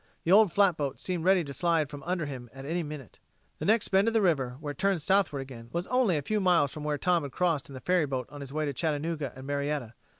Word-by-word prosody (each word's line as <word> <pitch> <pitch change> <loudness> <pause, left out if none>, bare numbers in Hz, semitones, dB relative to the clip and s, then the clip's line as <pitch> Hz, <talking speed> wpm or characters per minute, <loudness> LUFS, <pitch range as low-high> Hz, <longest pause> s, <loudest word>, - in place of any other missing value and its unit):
The 170 - 0
old 205 -1 +7
flatboat 170 -9 +2
seemed 175 -3 -3
ready 190 -1 +4
to 140 -2 -7
slide 165 -1 +1
from 145 0 -9
under 175 -3 -1
him 130 -4 -7
at 135 0 -9
any 170 +4 -1
minute. 150 -6 -8 0.4
The - - -3
next 220 +2 +3
bend 195 +3 +3
of 230 - +1
the 225 - +4
river, 135 -8 +1
where 150 -1 -4
it 145 - -12
turned 195 -2 +2
southward 190 -6 +2
again, 120 -3 -10
was 175 +1 -1
only 250 -9 +2
a 145 - -3
few 215 +8 0
miles 175 -8 +3
from 150 - -7
where 150 -1 -1
Tom 175 +2 +2
had 140 -2 -6
crossed 165 -7 0
in 135 - -9
the 130 - -8
ferryboat 145 -8 0
on 145 - -9
his 135 -1 -8
way 155 +1 -1
to 145 - -2
Chattanooga 155 0 -2
and 130 +1 -10
Marietta. 140 -4 -2
155 Hz, 260 wpm, -29 LUFS, 140-180 Hz, 0.4 s, old